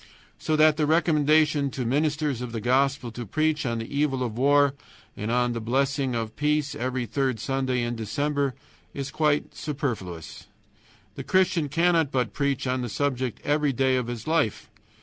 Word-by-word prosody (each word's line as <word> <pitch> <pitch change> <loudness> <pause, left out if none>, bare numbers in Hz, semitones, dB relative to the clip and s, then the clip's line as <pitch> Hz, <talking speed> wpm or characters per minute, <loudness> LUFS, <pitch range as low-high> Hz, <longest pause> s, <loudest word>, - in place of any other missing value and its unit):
So 155 - 0
that 155 0 +5
the 150 -2 +1
recommendation 155 -2 +3
to 130 -1 -4
ministers 145 0 0
of 125 -2 -5
the 115 - -2
Gospel 130 +1 +1
to 120 +2 -6
preach 155 +5 0
on 115 -1 -1
the 115 +5 -6
evil 140 -3 +1
of 115 -3 -3
war 140 +2 +4 0.4
and 120 +3 0
the 115 - -3
blessing 135 +2 0
of 110 -1 -3
peace 150 -1 0
every 130 0 -2
third 130 +1 -1
Sunday 130 0 -1
in 120 0 -2
December 140 +5 -1 0.4
is 140 0 -4
quite 150 -2 +1
superfluous. 115 - -5 0.7
The - - -7
Christian 185 -5 +2
cannot 165 -1 +2
but 125 -4 -1
preach 140 -2 -1
on 130 0 0
that 120 - -3
subject 130 -1 -2
every 145 -1 +1
day 130 +1 +2
of 125 -2 -1
his 120 -2 -5
life. 155 -9 0
135 Hz, 170 wpm, -26 LUFS, 120-150 Hz, 0.7 s, that